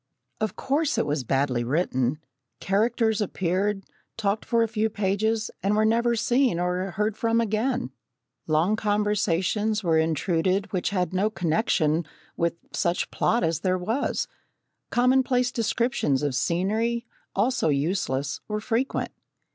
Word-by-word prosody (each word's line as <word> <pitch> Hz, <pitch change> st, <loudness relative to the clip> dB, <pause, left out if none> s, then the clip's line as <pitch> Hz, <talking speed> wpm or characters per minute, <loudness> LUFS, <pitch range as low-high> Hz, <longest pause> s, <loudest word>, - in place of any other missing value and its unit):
Of 215 Hz, -3 st, -2 dB
course 300 Hz, +3 st, 0 dB
it -, -, +2 dB
was 145 Hz, -2 st, -1 dB
badly 130 Hz, -1 st, 0 dB
written. 130 Hz, -1 st, 0 dB, 0.4 s
Characters 220 Hz, +2 st, +1 dB
appeared, 195 Hz, +1 st, -1 dB, 0.3 s
talked 210 Hz, -1 st, -1 dB
for 235 Hz, -1 st, +2 dB
a -, -, +1 dB
few 220 Hz, 0 st, 0 dB
pages, 215 Hz, +2 st, 0 dB
and 200 Hz, +3 st, +1 dB
were 215 Hz, 0 st, +3 dB
never 235 Hz, +2 st, +2 dB
seen 240 Hz, -3 st, +2 dB
or 180 Hz, +2 st, -1 dB
heard 210 Hz, +3 st, -1 dB
from 230 Hz, 0 st, +1 dB
again. 230 Hz, +3 st, 0 dB, 0.6 s
Long 165 Hz, +7 st, +2 dB
conversations 210 Hz, 0 st, 0 dB
were 165 Hz, -2 st, +3 dB
intruded 175 Hz, +5 st, 0 dB
which 185 Hz, -, 0 dB
had 180 Hz, -3 st, -1 dB
no 195 Hz, +3 st, +2 dB
connection 165 Hz, -4 st, +1 dB, 0.3 s
with 170 Hz, 0 st, 0 dB, 0.2 s
such 175 Hz, +1 st, 0 dB
plot 235 Hz, -, +1 dB
as 165 Hz, -1 st, +1 dB
there 185 Hz, +1 st, +1 dB
was. 220 Hz, +10 st, -1 dB, 0.6 s
Commonplace 250 Hz, 0 st, +3 dB
descriptions 230 Hz, -, 0 dB
of 145 Hz, -2 st, 0 dB
scenery, 215 Hz, -, 0 dB, 0.3 s
also 220 Hz, -4 st, +1 dB
useless, 140 Hz, -2 st, -1 dB
were 210 Hz, 0 st, -2 dB
frequent. 235 Hz, +4 st, -1 dB
205 Hz, 130 wpm, -25 LUFS, 170-225 Hz, 0.6 s, were